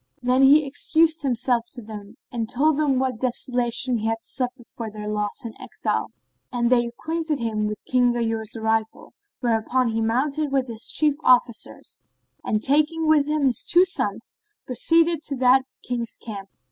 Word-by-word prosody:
Then 250 +1 +3
he 285 +3 +6
excused 320 +3 +2
himself 245 -3 0
to 245 - -4
them 210 0 -10
and 230 -2 -3
told 300 +3 +2
them 285 -4 +2
what 255 -3 -1
desolation 245 0 +1
he 220 - -2
had 225 0 0
suffered 250 -1 -4
for 230 -2 -7
their 210 0 -8
loss 210 +1 -3
and 225 - -6
exile; - - -2 0.4
and 240 -1 0
they 240 -1 +3
acquainted 315 +5 -3
him 220 -3 -2
with 210 0 -6
King 250 -1 +3
Ghayur's 225 -2 -2
arrival, 220 0 -2 0.3
whereupon 240 +1 +1
he 225 0 -1
mounted 275 +6 0
with 265 -2 0
his 225 -1 -1
chief 300 -2 +2
officers 240 -2 +1 0.4
and 215 -1 -1
taking 305 +4 +2
with 305 -2 +3
him 300 -1 0
his 255 -3 0
two 355 +2 +5
sons, 220 - -3 0.3
proceeded 330 +6 +2
to 285 -3 -4
that 260 +1 +4 0.2
King's 235 -2 -4
camp. 200 -3 -8
245 Hz, 165 wpm, -23 LUFS, 225-280 Hz, 0.4 s, he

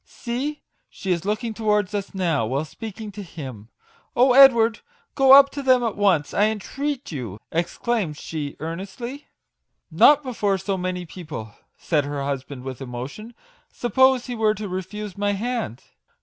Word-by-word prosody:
See, 270 +5 -5 0.3
she 190 - -4
is 175 0 -1
looking 215 +2 -1
towards 210 -2 0
us 200 -1 -4
now, 170 -10 +1
while 135 +6 -1
speaking 215 +5 -8
to 205 +1 -8
him! 130 - -9 0.5
Oh, 250 +1 +5
Edward, 235 -4 +7 0.3
go 270 -1 +6
up 275 0 +9
to 285 - -5
them 255 -2 +4
at 230 -3 -1
once, 190 -8 +2
I 205 - +4
entreat 270 +6 -3
you! 115 - -6
" - - -56
exclaimed 175 0 -1
she 150 -3 -5
earnestly. 195 - -6 0.3
" - - -55 0.3
Not 295 0 +6
before 210 -6 0
so 195 +2 -2
many 180 -1 -3
people/' 155 - -8 0.2
said 150 -4 0
her 145 -1 -3
hus 140 -1 -2
band 130 -2 -10
with 130 0 -7
emotion. 135 - -7 0.2
" - - -36
Suppose 260 +2 +4
he 250 - -5
were 215 -1 +2
to 215 -1 -5
refuse 190 +2 -6
my 205 0 +1
hand?" 220 - -3
205 Hz, 170 wpm, -23 LUFS, 160-240 Hz, 0.5 s, up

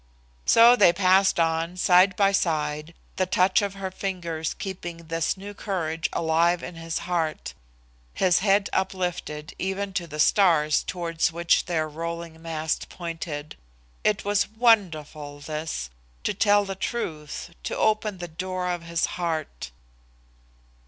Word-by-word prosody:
So 235 +2 +8
they 200 -7 +6
passed 190 +1 +3
on, 165 +2 0
side 185 +1 +5
by 195 0 +3
side, 155 -3 -1 0.2
the 185 - +1
touch 185 +2 +3
of 200 -1 -3
her 190 -1 -5
fingers 170 -5 -3
keeping 180 -3 -6
this 165 +1 -2
new 200 +2 -8
courage 165 -5 -2
alive 170 +2 +2
in 180 - -6
his 165 0 -4
heart, 165 -3 -2 0.6
his 180 -2 +3
head 200 0 +3
uplifted 175 -5 -2
even 190 +1 -2
to 180 -3 -2
the 150 -1 -8
stars 155 -4 +4
towards 170 -2 -1
which 170 +1 +2
their 160 -3 -1
rolling 165 +1 -6
mast 160 -1 -3
pointed. 165 -3 -6 0.5
It 210 -2 +1
was 205 0 +1
wonderful, 165 -11 +1
this 150 - -4 0.3
to - - 0
tell 205 0 +3
the 195 - -4
truth, 170 -7 -4
to - - -4
open 215 -2 +1
the 175 -1 -6
door 180 +2 -3
of 175 -1 -3
his 170 0 -1 0.2
heart! 155 - -3
175 Hz, 140 wpm, -25 LUFS, 160-190 Hz, 0.6 s, So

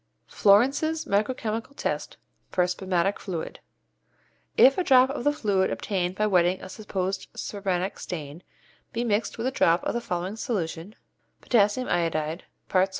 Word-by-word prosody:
Florence's 275 +10 +3
Micro 210 +6 +1
Chemical 225 +4 -4
Test - - -3 0.3
for 180 - +2
Spermatic 185 +1 0
Fluid. 175 -5 -5 1.0
If 270 +6 +6
a - - +2
drop 260 -3 +5
of 275 - -4
the 290 - +4
fluid 200 -9 +1
obtained 185 -3 -2
by 210 - +1
wetting 180 -2 +3
a 185 - -9
supposed 190 -2 -3
spermatic 195 -2 -3
stain 155 -2 -6 0.5
be 235 - -1
mixed 220 -1 0
with 230 - -3
a 260 - +1
drop 170 -9 +3
of - - -1
the 235 - -2
following 185 +1 -3
solution 190 -4 -3 0.5
(KI, 215 -5 +5
parts 205 - -6
1. 170 -2 -1
200 Hz, 150 wpm, -26 LUFS, 180-235 Hz, 1.0 s, If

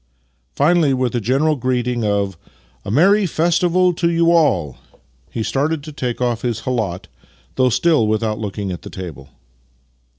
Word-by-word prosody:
Finally, 150 -2 +3
with 125 -2 -1
a 120 - -1
general 135 +8 +1
greeting 125 -2 -1
of 100 -2 0 0.3
" - - -35
A - - -5
merry 190 - +4
festival 175 +2 +2
to 170 0 0
3'ou 170 0 +2
all! 95 - +2 0.3
" 65 0 -37
he 115 - -3
started 145 +5 -1
to 155 - -8
take 125 -4 -4
off 120 -2 -1
his 115 -3 -2
khalat 110 -7 -2 0.3
— 60 +1 -33
though 130 -1 +3
still 150 -3 +2
Vv'ithout 110 0 -1
looking 100 -2 -4
at 90 - -6
the - - -9
table. 80 -7 -9
125 Hz, 170 wpm, -19 LUFS, 105-155 Hz, 0.3 s, merry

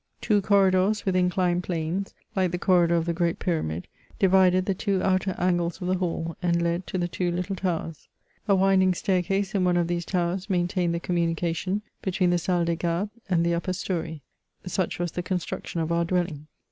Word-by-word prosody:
Two 210 -2 +2
corridors, 195 +1 +3
with 190 -2 +1
inclined 180 -1 +2
planes, 175 +2 -3 0.2
like 185 -2 +2
the 175 - -2
corridor 175 -2 +3
of 165 -1 +1
the 170 - 0
great 170 0 0
Pyramid, 90 - -2 0.3
divided 185 -1 +4
the 195 - +1
two 195 0 -1
outer 190 0 +1
angles 175 -1 0
of 180 - -4
the - - +3
hall, 165 -2 -2
and 170 -1 +2
led 170 +1 -1
to - - -3
the 175 -1 0
two 175 0 -2
little 180 +3 -2
towers. 165 -4 -3 0.4
A 200 - +5
winding 190 -1 +4
staircase 195 +2 0
in 195 -3 +1
one 180 -1 +3
of 175 - +2
these 175 0 -2
towers 180 +2 -1
maintained 175 -1 +1
the - - -1
communication 170 +3 -1 0.2
between 185 -1 +1
the 175 - +2
Salle 175 0 +1
des 170 0 0
Gardes" 175 +5 -1 0.2
and 170 -2 +2
the 170 - +2
upper 175 +2 -1
story. 165 -5 -4 0.4
Such 180 0 -1
was 175 -1 -2
the 180 - -3
con 185 +1 -1
struction 170 -1 -4
of 160 +1 -2
our 170 0 +2
dwelling. 170 -4 -2
180 Hz, 195 wpm, -26 LUFS, 170-185 Hz, 0.4 s, A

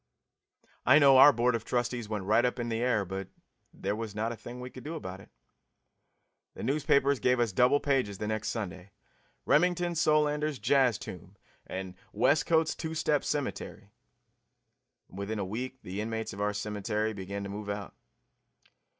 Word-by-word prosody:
I 145 - +6
know 135 -3 +7
our 145 - +10
board 120 0 +1
of 115 -1 -2
trustees 120 -2 -2
went 105 -3 -3
right 110 +4 +3
up 125 0 0
in 120 -1 -3
the 115 0 -1
air, 120 -4 +1
but 95 +1 -5 0.4
there 100 +2 -3
was 110 -2 -6
not 110 +2 -1
a - - -5
thing 120 +2 -9
we 125 0 -7
could 130 - -11
do 160 +3 -5
about 95 - -6
it. 95 - -15 1.3
The - - -7
newspapers 140 -1 +2
gave 125 0 +2
us 120 -3 +1
double 125 +8 +4
pages 130 -9 0
the 105 - -4
next 110 0 -2
Sunday 95 -3 -5 0.5
"Remington 175 -1 +2
Solander's 150 -2 +2
Jazz 130 -5 +3
Tomb" 95 -1 -10 0.3
and 95 -1 -5 0.2
"Westcote's 160 +2 +3
Two 160 -1 -5
Step 150 -2 +1
Cemetery." 115 -7 -4 1.2
And 95 - -11
within 105 +2 -3
a 100 - -2
week 125 +6 -5
the 95 +3 -4
inmates 110 -1 -4
of 100 - -6
our 105 0 +1
cemetery 105 +1 -2
began 100 0 -5
to 100 - -6
move 105 +1 -6
out. 100 -1 -5
115 Hz, 170 wpm, -30 LUFS, 100-135 Hz, 1.3 s, our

